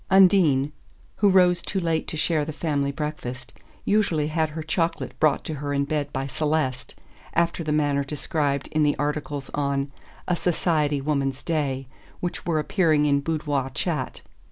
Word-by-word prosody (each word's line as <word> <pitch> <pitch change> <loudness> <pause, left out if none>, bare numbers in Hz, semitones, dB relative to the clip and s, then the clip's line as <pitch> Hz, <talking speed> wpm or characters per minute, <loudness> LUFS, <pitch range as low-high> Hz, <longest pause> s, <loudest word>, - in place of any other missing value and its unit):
Undine, 175 -8 +5 0.5
who 205 - +4
rose 180 -2 +5
too 190 - -2
late 165 -3 0
to 160 - -4
share 155 -1 +1
the 155 - -4
family 145 -3 -1
breakfast, 140 -4 -5 0.3
usually 175 -8 +2
had 160 0 +1
her 155 +1 -5
chocolate 165 +1 -1
brought 155 -2 +3
to 160 - -4
her 145 -1 -2
in 140 0 +1
bed 145 -1 -2
by 135 0 -2
Celeste, 145 -2 -1 0.4
after 170 0 +1
the 155 - -2
manner 145 -2 +2
described 140 0 -1
in 155 - +1
the 150 -1 +3
articles 145 -1 -3
on 140 -1 -1 0.4
"A 180 - +2
Society 155 -5 +1
Woman's 135 -2 -1
Day" 140 -5 -1 0.3
which 175 0 -4
were 165 -2 +2
appearing 155 -2 +2
in 140 -1 +3
Boudoir 145 -3 -1
Chat. 145 -1 -3
150 Hz, 160 wpm, -25 LUFS, 140-165 Hz, 0.5 s, Undine